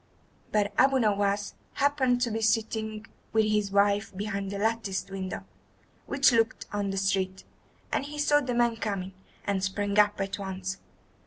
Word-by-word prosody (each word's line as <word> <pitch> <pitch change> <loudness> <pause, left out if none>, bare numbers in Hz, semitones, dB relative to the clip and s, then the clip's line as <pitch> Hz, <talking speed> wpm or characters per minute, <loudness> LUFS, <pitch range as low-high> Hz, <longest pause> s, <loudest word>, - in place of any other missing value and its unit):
But 205 -1 +1
Abu 270 +1 +5
Nowas 205 -3 +1 0.2
happened 265 -3 +2
to 240 -2 +1
be 225 +1 -2
sitting 220 -1 0 0.3
with 220 -1 +4
his 210 -1 +1
wife 200 +1 +2
behind 200 -1 -3
the 200 - -4
latticed 205 -3 -1
window, 190 -1 -4 0.6
which 275 -1 +4
looked 225 -1 +1
on 205 -1 -1
the 195 - -3
street, 190 -1 0 0.5
and - - +1
he 295 +1 -7
saw 295 0 +4
the 250 -3 -2
man 235 -1 +2
coming, 195 -4 -3 0.3
and 195 -2 0
sprang 200 +1 0
up 205 -1 +4
at 195 +1 -2
once. 190 -1 -4
205 Hz, 160 wpm, -28 LUFS, 195-230 Hz, 0.6 s, Abu